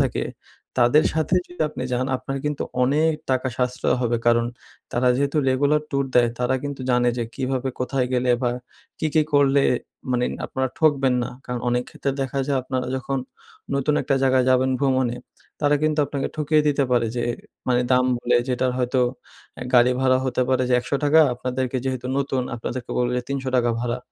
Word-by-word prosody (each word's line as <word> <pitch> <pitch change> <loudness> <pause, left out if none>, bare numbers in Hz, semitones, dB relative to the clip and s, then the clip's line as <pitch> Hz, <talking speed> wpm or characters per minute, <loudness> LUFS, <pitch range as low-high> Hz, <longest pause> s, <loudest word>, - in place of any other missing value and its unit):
থাকে। - - 0 0.5
তাদের 125 +6 +5
সাথে 160 +2 0
যদি 175 -2 -4
আপনি 150 - -6
যান 125 +1 0
আপনার 135 +2 -5
কিন্তু 150 -1 -1 0.2
অনেক 150 +5 +3 0.2
টাকা 130 0 +1
সাশ্রয় 125 0 0
হবে 120 -1 +1
কারণ 115 0 +4 0.5
তারা 125 +1 +2
যেহেতু 140 +2 0
রেগুলার 145 +3 +2
ট্যুর 140 -1 +1
দেয় 120 -1 +5
তারা 125 +1 +1
কিন্তু 140 -1 -5
জানে 125 0 +3
যে 120 - 0
কীভাবে 130 0 -2
কোথায় 125 0 0
গেলে 125 0 +1
বা 120 - +2 0.5
কি, 155 - 0
কি 155 - +5
করলে? 140 -1 +4 0.5
মানে 125 0 +1 0.2
আপনারা 130 0 -2
ঠকবেন 140 -5 +3
না। - - -4
কারণ 125 -1 -4
অনেক 120 0 +1
ক্ষেত্রে 140 - -3
দেখা 135 +1 -3
যায় 140 -2 +1
আপনারা 130 -1 -3
যখন 135 +1 -2 0.6
নতুন 140 +2 +1
একটা 135 - +1
জায়গায় 130 -1 +3
যাবেন 130 +1 +3
ভ্রমণে 130 -3 +1 0.4
তারা 145 0 +3
কিন্তু 155 0 +1
আপনাকে 140 -1 -3
ঠকিয়ে 150 0 +2
দিতে 140 -1 +2
পারে 120 -2 +3
যে 120 - 0 0.4
মানে 125 -1 +3
দাম 125 0 +4
বলে 120 0 +2
যেটার 125 0 0
হয়তো 125 +1 +1 0.6
আ - - -3
গাড়ি 125 +1 +6
ভাড়া 130 -1 +3
হতে 130 0 0
পারে 130 -1 +2
যে 125 - +3
১০০ 120 - -11
টাকা 150 +2 +6
আপনাদেরকে 125 +1 -2
যেহেতু 130 -1 -3
নতুন, 135 -2 -1
আপনাদেরকে 120 +1 -5
বলবে 125 0 +1
৩০০ 140 -1 -3
টাকা 120 -1 +2
ভাড়া। 120 0 -2
130 Hz, 180 wpm, -23 LUFS, 125-140 Hz, 0.6 s, গাড়ি